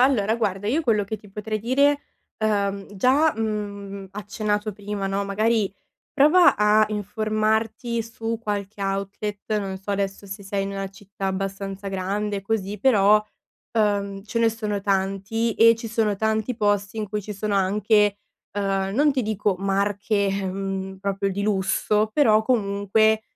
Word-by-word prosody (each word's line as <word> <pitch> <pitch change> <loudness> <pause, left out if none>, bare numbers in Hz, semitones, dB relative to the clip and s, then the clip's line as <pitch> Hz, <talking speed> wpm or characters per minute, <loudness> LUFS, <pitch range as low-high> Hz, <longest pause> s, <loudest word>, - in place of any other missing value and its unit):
allora 230 -5 +3
guarda 205 -3 -1
io 285 +8 +2
quello 220 -8 +2
che 220 +2 -4
ti 210 - -16
potrei 215 +2 -3
dire, 280 +5 +3 0.4
uhm, 200 -2 0
già, 270 +9 +4
mhmm, 200 -3 -4
accennato 210 +1 -2
prima, 205 0 -4
no, 195 +1 -1
magari 215 +1 +1 0.4
prova 315 +6 +6
a 210 +1 +4
informarti 215 +3 -1
su 225 0 -4
qualche 205 -1 -4
outlet, 200 +2 -3
non 195 -2 -4
so 195 +2 -7
adesso 195 0 -2
se 195 0 -8
sei 195 0 -2
in 195 - -3
una 195 0 -4
città 195 0 -7
abbastanza 195 +1 -3
grande 200 +2 -2
così, 205 0 -2
però, 210 -3 +5 0.5
uhm, 200 -3 0
ce 225 +2 -3
ne 230 0 +4
sono 215 -2 -3
tanti 195 +4 0
e 230 +1 +7
ci 230 0 -7
sono 215 -3 0
tanti 220 +3 0
posti 205 -1 0
in 215 - -2
cui 210 +1 -3
ci 210 +2 -7
sono 205 +1 -2
anche, 205 +1 +3 0.3
uhm, 195 -1 -1
non 290 +4 +3
ti 260 - +1
dico 210 -3 0
marche, 200 +2 0
ehm, 195 0 -3
proprio 195 0 -1
di 200 - -3
lusso, 210 +1 +1
però 220 -7 +4
comunque, 220 -1 +2
205 Hz, 150 wpm, -24 LUFS, 195-220 Hz, 0.5 s, e